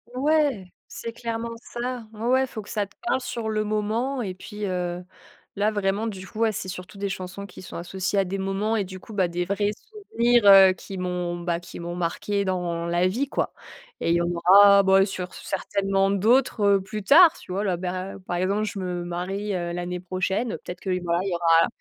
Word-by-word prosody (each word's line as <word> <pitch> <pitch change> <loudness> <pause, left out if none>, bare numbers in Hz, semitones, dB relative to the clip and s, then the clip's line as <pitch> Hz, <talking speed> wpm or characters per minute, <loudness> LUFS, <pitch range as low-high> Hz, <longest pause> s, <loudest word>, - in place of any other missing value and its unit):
Ouais. 275 - +1 0.2
C'est 230 0 -7
clairement 230 0 -4
ça. 245 -1 -5
Ouais, 215 +2 -6
ouais, 260 +2 +3
faut 225 -3 -7
que - - -14
ça 205 -3 -1
te - - -27
parle 250 +2 +1
sur 230 -3 -4
le 215 0 0
moment. 220 +5 -1
Et 190 - -4
puis, 210 +3 -7
heu, 180 -1 -3 0.5
là, 205 +1 +2
vraiment, 205 +2 0
du 190 -3 -6
coup, 215 - -9
ouais, 225 -1 +3
c'est 190 - -5
surtout 180 +1 -8
des 200 0 -2
chansons 190 +1 -6
qui 190 - -12
sont 185 - -8
associées 190 +3 -3
à 195 - +2
des 195 +2 -4
moments 195 +3 -1
et 210 - +1
du 185 0 -9
coup, 220 - -12
bah, 190 -3 +2
des 175 +1 -2
vrais 205 +2 0
souvenirs, 240 - 0
heu, 195 -1 +9
qui 195 +2 -9
m'ont, 180 -1 -2
bah, 170 -1 -1
qui 175 - -10
m'ont 170 +1 -5
marquée 200 +4 -1
dans 175 -3 -2
la 175 +1 +2
vie, 265 +9 -1
quoi. - - -2 0.5
Et - - 0
il 170 - +4
y 170 - +2
en - - 0
aura, 200 +4 +7
bah, 195 0 +5
sur 185 -2 -5
certainement 195 0 -1
d'autres, 225 +4 +2 0.2
heu, - - -4
plus 210 +2 -6
tard, 325 - +7
tu - - -11
vois? 200 +3 -1
Là, 185 -4 0
beh, 185 +1 -4
par 175 - -2
exemple, 200 +4 0
je 205 -1 -4
me 180 -1 -3
marie, 190 +4 -3
heu, 175 -2 -2
l'année 175 0 -4
prochaine, 190 +5 -2
peut - - -8
être - - -9
que 195 - -5
voilà, 170 0 +1
il 195 - -2
y - - -2
aura 165 -1 +4
195 Hz, 225 wpm, -25 LUFS, 180-215 Hz, 0.5 s, heu